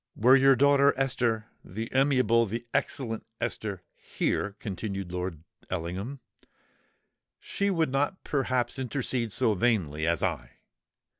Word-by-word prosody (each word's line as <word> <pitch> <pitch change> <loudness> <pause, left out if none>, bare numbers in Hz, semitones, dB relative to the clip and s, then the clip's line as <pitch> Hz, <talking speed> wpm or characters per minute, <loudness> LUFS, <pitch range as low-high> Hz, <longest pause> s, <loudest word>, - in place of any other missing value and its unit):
"Were 125 +5 +6
your 135 0 +6
daughter 140 +1 +4
Esther—the 115 -4 -2
amiable, 130 -4 +3
the 115 +4 -4
excellent 115 -5 -1 0.2
Esther 100 -5 -3
here," 100 0 -2
continued 95 -3 -5
Lord 90 -3 -4 0.3
Ellingham, 95 +10 -4 1.2
"she 200 0 -2
would 165 -7 +1
not 145 +8 -1
perhaps 130 -2 -1
intercede 125 -3 -2
so 115 0 +2
vainly 90 -9 0
as 85 0 +1
I. - - -2
115 Hz, 115 wpm, -28 LUFS, 95-135 Hz, 1.2 s, Were